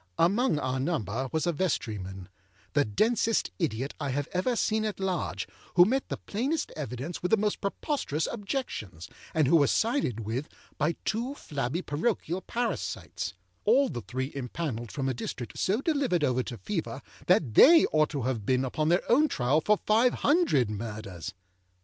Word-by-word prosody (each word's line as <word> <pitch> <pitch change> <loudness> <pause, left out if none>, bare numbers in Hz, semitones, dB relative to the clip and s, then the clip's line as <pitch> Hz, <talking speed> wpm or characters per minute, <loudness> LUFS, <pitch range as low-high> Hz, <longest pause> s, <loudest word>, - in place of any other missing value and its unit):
Among 195 - +3
our 130 -2 -1
number 130 - -1
was 160 -2 0
a 175 - +1
vestryman, 105 - -2 0.5
âthe 140 -9 +1
densest 225 0 +2
idiot 135 - -1
I 145 -2 -2
have 145 +2 -1
ever 190 +7 +1
seen 220 -1 +1
at 215 -2 -3
large, 190 -2 -2 0.3
âwho 175 - +9
met 260 +6 0
the - - -3
plainest 275 +9 -2
evidence 140 +2 -5
with 180 - -1
the 225 - +5
most 210 0 -1
preposterous 200 - -1
objections, 200 - -4 0.3
and 155 -4 +4
who 170 - +5
was 145 -3 +4
sided 225 - +1
with 115 +7 -3 0.3
by 155 +2 +1
two 240 +6 -1
flabby 145 - -3
parochial 175 +2 -1
parasites; 230 - -3 0.3
all 255 +5 +4
the 120 - -4
three 130 +7 -4
impanelled 125 -3 -4
from 135 -2 -2
a 130 - +1
district 120 0 -6
so 210 +7 +1
delivered 275 - +1
over 130 -2 +2
to 120 -1 -6
Fever 95 - -4 0.2
that 110 - +3
they 330 - +8
ought 155 -1 +3
to 140 -4 -3
have 120 -4 -1
been 130 +4 +1
upon 155 +4 0
their 175 +2 +3
own 290 +6 +5
trial 135 - +1
for 210 +4 +3
five 225 +5 +3
hundred 285 - +3
Murders. 105 -5 -6
155 Hz, 170 wpm, -28 LUFS, -, 0.5 s, âwho